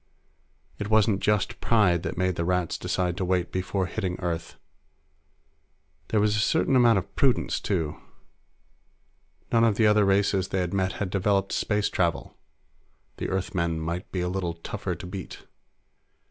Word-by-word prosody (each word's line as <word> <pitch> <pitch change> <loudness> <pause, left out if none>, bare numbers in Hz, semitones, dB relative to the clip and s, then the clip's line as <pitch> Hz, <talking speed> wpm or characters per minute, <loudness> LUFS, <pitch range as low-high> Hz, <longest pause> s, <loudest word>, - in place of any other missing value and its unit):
It 105 - -4
wasn't 110 -2 +3
just 105 +3 0
pride 95 -7 +3
that - - -3
had - - -21
made 95 0 +1
the 85 - -1
Rats 90 -1 0
decide 90 -2 -1
to - - -1
wait 90 -1 0
before 95 +1 -1
hitting 95 -1 -3
Earth; 85 -2 -4 1.5
there 110 - +1
was 105 0 +2
a - - +1
certain 145 +3 +2
amount 120 -4 +5
of 100 +1 -4
prudence, 135 -3 +2
too. 80 -7 -2 1.5
None 115 0 +4
of 115 -3 +3
the 110 - +3
other 105 0 +5
races 100 -1 +2
they 95 - -1
had 90 0 -3
met 95 -1 0
had 95 -3 -4
developed 100 0 +1
space 105 -1 0
travel; 85 -11 -1 0.8
the - - -3
Earthmen 85 -3 -1
might 85 +4 -4
be 90 - -2
a 90 - -1
little 90 -2 -2
tougher 85 - -4
to - - -9
beat. 95 0 -8
95 Hz, 160 wpm, -26 LUFS, 90-105 Hz, 1.5 s, amount